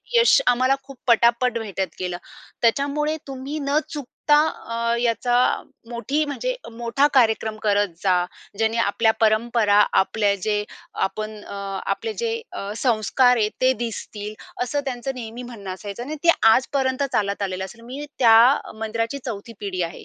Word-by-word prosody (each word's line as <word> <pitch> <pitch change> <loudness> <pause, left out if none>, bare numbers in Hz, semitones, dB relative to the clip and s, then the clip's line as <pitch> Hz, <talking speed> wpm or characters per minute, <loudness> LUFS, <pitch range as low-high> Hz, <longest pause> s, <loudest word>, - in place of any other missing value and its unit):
यश 470 +1 +6
आम्हाला 255 +2 +3
खूप 275 -1 -12
पटापट 235 +1 +4
भेटत 190 -5 -4
गेलं. 180 -1 -2 0.5
त्याच्यामुळे 285 +6 +1
तुम्ही 275 +3 -5
न 280 +2 +1
चुकता 295 0 +1 0.3
अ, 235 0 0
याचा 240 +1 +1 0.6
मोठी 275 +6 -1
म्हणजे - - -2 0.2
मोठा 235 +5 +1
कार्यक्रम 220 -3 +3
करत 205 -1 +2
जा. 190 -2 +3 0.4
ज्याने 225 +1 +1
आपल्या 220 +2 +2
परंपरा, 215 -1 +3 0.2
आपल्या 205 +1 +1
जे 210 -1 +1 0.4
आपण 215 +2 -6
अ, - - -9 0.4
आपले 445 - -5
जे 460 -1 0 0.2
अ, 200 +1 -5
संस्कार 245 +2 +3
आहेत 215 -2 +1
ते 255 - +5
दिसतील 210 -2 -6 0.3
असं 285 +4 -1
त्यांचं 265 +1 -3
नेहमी 235 0 -7
म्हणणं 215 -6 -7
असायचं 205 +4 -7
आणि 305 +3 -5
ते 340 - +8 0.2
आजपर्यंत 265 0 0
चालत 200 -1 0
आलेलं 190 -1 -2
आहे. 230 +5 -11
मी 265 +5 -7
त्या 225 -3 +7 0.4
मंदिराची 230 +4 -2
4थी 230 0 -6
पिढी 185 -3 -2
आहे. 170 0 -6
235 Hz, 145 wpm, -23 LUFS, 210-265 Hz, 0.6 s, ते